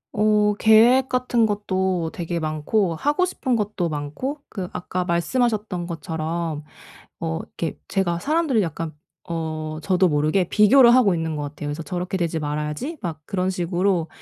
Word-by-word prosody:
어. 210 0 +3
계획 235 +4 +6
같은 250 -2 +2
것도 190 -5 -1
되게 170 0 -3
많고 160 +5 0
하고 295 - +1
싶은 260 -8 -1
것도 205 -5 -1
많고 150 - -4
그 185 -4 -5
아까 180 0 -3
말씀하셨던 195 +1 0
것처럼 160 -1 -3 0.6
어 160 -1 -2
이렇게 165 - -5
제가 180 -4 0
사람들을 300 - +1
약간 165 -2 -4 0.4
어 155 -2 -4
저도 185 0 +3
모르게 155 +4 +1
비교를 235 +3 +6
하고 240 -7 +5
있는 160 -2 -2
것 150 - -3
같아요. 145 0 -6
그래서 145 +3 -4
'저렇게 180 +1 -3
되지 170 -3 -1
말아야지.' 150 - -3
막 165 -6 -5
그런 185 -1 -1
식으로 180 -1 0
180 Hz, 325 characters per minute, -23 LUFS, 160-215 Hz, 0.6 s, 계획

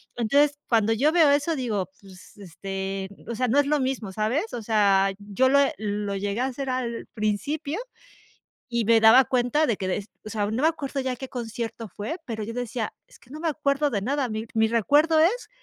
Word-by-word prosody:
Entonces, 285 +5 +2
cuando 225 -2 +3
yo 275 +7 +2
veo 325 -3 +5
eso, 290 +3 +1
digo, 215 - -2
pues, 190 -2 -15
este, 195 +1 -5 0.2
o 235 - -3
sea, 255 +3 0
no 260 +5 +3
es 285 - +2
lo 300 0 +2
mismo, 260 -6 -2
¿sabes? 225 - -1
O 240 - -4
sea, 200 -3 +3
yo 205 +5 +1
lo 280 +2 +5 0.2
lo 205 -1 -3
llegué 200 +3 -2
a - - +2
hacer 270 +1 -4
al 245 -2 -3
principio 280 - -2 0.9
y 235 -2 0
me 230 +1 +5
daba 225 +4 +7
cuenta 255 +5 +1
de 230 -5 0
que 190 - -3
de, 195 +2 -2 0.2
o - - -6
sea, 210 -1 -1
no 225 +6 -2
me - - +6
acuerdo 290 -4 -2
ya 260 -1 -2
qué 265 +2 -7
concierto 230 -2 -5
fue, 210 - -5
pero 220 -5 -4
yo 225 +2 -6
decía, 240 -2 -3 0.2
es - - -19
que - - -23
no 300 +3 -8
me 330 0 0
acuerdo 285 -1 0
de 205 -4 -1
nada, 265 +3 -1
mi 220 +1 -4
mi 220 0 +4
recuerdo 290 +8 +3
es, 385 +11 +2
235 Hz, 210 wpm, -25 LUFS, 210-280 Hz, 0.9 s, daba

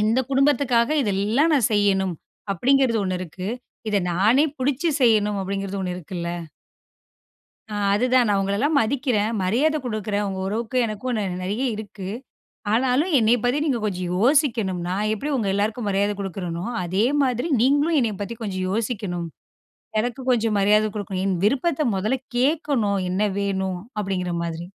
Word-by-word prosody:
இந்த 225 +4 +3
குடும்பத்துக்காக 270 -3 +3
இதெல்லாம் 215 +9 +1
நான் 260 -7 +3
செய்யணும். 195 -3 +2 0.4
அப்டிங்கிறது 250 +4 +2
ஒண்ணு 185 -1 -1
இருக்கு. 185 +2 -6 0.4
இத 210 - +1 0.2
நானே 215 - +4
புடிச்சு 280 +5 0
செய்யணும் 210 -4 +3
அப்டிங்கிறது 195 0 -3
ஒண்ணு 180 -1 -2
இருக்குல்ல. 170 0 -5 1.5
ஆ, - - -2 0.2
அதுதான். 250 +3 +3
நான் 200 -1 +2
உங்களலாம் 210 +11 +1
மதிக்கிறேன். 230 -3 0
மரியாத 270 +12 +2
குடுக்குறேன். 210 -2 -2
உங்க 190 -1 -4
உறவுக்கு 225 +4 -2
எனக்கும் 225 +3 -3 0.3
நெறைய 205 +7 -2
இருக்கு. 205 -3 -7 0.6
ஆனாலும் 260 +9 +2
என்னைய 230 +2 +4
பத்தி 245 +4 +2
நீங்க 265 -6 +1
கொஞ்சம் 185 -3 -2
யோசிக்கணும். 230 - +2
நான் 200 +4 -1
எப்டி 245 +8 -4
உங்க 220 -5 -1
எல்லாருக்கும் 210 +3 -1
மரியாத 200 +1 +1
குடுக்குறேனோ, 180 -3 -4 0.2
அதே 190 +5 +1 0.2
மாதிரி 250 +1 0
நீங்களும் 290 +5 +3
என்னைய 225 -5 0
பத்தி 215 +3 -4
கொஞ்சம் 185 -4 -3
யோசிக்கணும். 200 -5 -2 0.7
எனக்கு 240 +3 -1
கொஞ்சம் 225 -3 +2
மரியாத 210 +2 +4
குடுக்கணும். 195 -3 -3
என் 190 -2 +1
விருப்பத்த 280 +7 +1
மொதல்ல 215 +7 0 0.2
கேட்கணும். 255 -7 +1
என்ன 185 +3 0 0.2
வேணும்? 190 -2 -1 0.2
அப்டிங்கிற 185 -3 -2
மாதிரி, 170 0 -4
215 Hz, 140 wpm, -23 LUFS, 195-250 Hz, 1.5 s, நானே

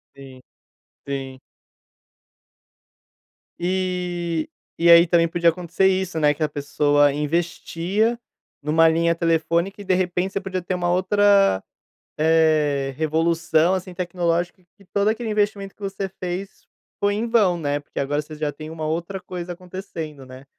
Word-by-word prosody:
Sim. 135 -2 -12 0.7
Sim. 135 -1 -5 2.2
E, 175 -2 -2 0.3
e 170 0 +3
aí, 170 +1 +8
também, 170 0 +3
podia 170 0 +3
acontecer 175 +2 0
isso, 185 -3 0
né, 150 -1 +4
que 155 - -3
a 155 - +1
pessoa 145 0 +2
investia 170 +8 -1 0.4
numa 160 +3 +4
linha 170 +1 +2
telefônica 170 +4 0
e, - - -10
de 185 - +2
repente, 180 +1 -1
você 200 - -2
podia 190 -1 -3
ter 180 - -3
uma 175 -1 -1
outra, 195 - +3 0.5
eh, 155 -3 +2
revolução, 160 +2 +2
assim, 185 -1 -4
tecnológica 175 0 -1
que 200 - -21
todo 200 +2 0
aquele 225 +1 -1
investimento 205 -2 -1
que - - -27
você 195 -1 -4
fez 185 +2 -6 0.3
foi 205 0 +2
em 220 +3 -2
vão, 210 -7 +3
né, 145 -3 -1
porque, 145 - -8
agora, 145 +2 0
você 155 +1 -11
já 150 -1 -2
tem 155 +2 -9
uma 160 -1 -5
outra 170 +5 -3
coisa 180 -1 -6
acontecendo, 170 -6 -8
né? 130 +1 -12
170 Hz, 145 wpm, -22 LUFS, 155-190 Hz, 2.2 s, aí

